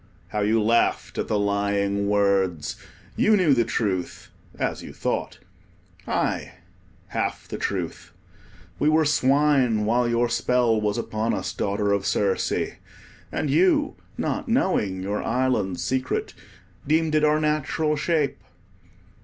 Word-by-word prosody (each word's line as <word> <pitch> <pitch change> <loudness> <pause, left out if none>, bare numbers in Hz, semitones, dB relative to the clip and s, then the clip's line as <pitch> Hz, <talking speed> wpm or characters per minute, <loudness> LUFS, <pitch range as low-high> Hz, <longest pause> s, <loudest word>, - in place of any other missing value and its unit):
how 105 - -2
you 105 +2 +2
laughed 115 +2 +1
at - - -1
the 105 - 0
lying 100 0 0
words. 100 -6 +1 0.4
You 215 0 +4
knew 170 -7 +4
the 120 -3 +3
truth—as 100 -6 -3
you - - -9
thought: - - -3 0.7
aye, - - -1 0.6
half - - -3
the - - -6
truth. 90 -4 -4 0.7
We 150 - +3
were 155 0 +3
swine 135 -5 +3
while 120 +2 +2
your 120 +1 +2
spell 120 -2 +1
was 105 -1 0
upon 110 +1 -1
us, 95 - -4
Daughter 100 +1 -1
of 100 -1 0
Circe, 100 -2 0 0.6
and 145 - -1
you, 190 - +3 0.2
not - - -2
knowing 105 - +1
your 100 +2 -2
island 115 -7 0
secret, 130 0 -2 0.5
deemed 160 +1 +2
it 155 0 +3
our 150 0 +4
natural 150 0 0
shape. 150 -2 0
115 Hz, 130 wpm, -24 LUFS, 100-150 Hz, 0.7 s, You